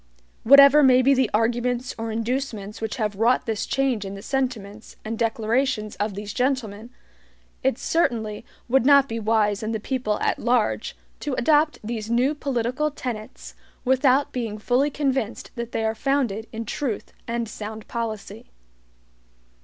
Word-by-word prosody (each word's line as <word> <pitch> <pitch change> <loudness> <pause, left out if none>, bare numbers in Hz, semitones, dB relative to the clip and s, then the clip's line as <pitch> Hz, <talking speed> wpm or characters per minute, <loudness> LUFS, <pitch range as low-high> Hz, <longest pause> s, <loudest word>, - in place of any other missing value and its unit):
Whatever 280 +3 +8
may 255 -2 +5
be 275 +2 +5
the 260 -3 +2
arguments 240 +3 0
or 225 0 -4
inducements 225 -2 -3
which 220 -1 -3
have 210 -4 -2
wrought 235 +4 +2
this 220 -3 -2
change 265 -6 0
in 195 0 -6
the 195 - -10
sentiments 225 -6 -3
and 220 +1 -3
declarations 225 0 0
of 205 -1 -2
these 205 +1 -6
gentlemen, 240 -4 -2 0.7
it 265 -2 +1
certainly 230 -11 -1 0.2
would 260 0 +3
not 280 0 +6
be 230 -3 -4
wise 210 -2 +1
in 220 +1 -3
the 220 - -2
people 225 -2 -2
at - - 0
large 240 -2 0 0.2
to 290 -4 -3
adopt 300 +4 +3
these 220 0 -4
new 250 +5 +2
political 270 0 -1
tenets 240 -7 -7 0.3
without 265 +2 +3
being 230 -4 -3
fully 250 +6 +1
convinced 265 -6 -2
that 235 0 -6
they 225 - -1
are 220 - +1
founded 235 -4 -1
in 225 0 -5
truth 235 -2 -4
and 235 0 -2
sound 215 0 -7
policy. 225 -3 -5
235 Hz, 155 wpm, -24 LUFS, 215-265 Hz, 0.7 s, Whatever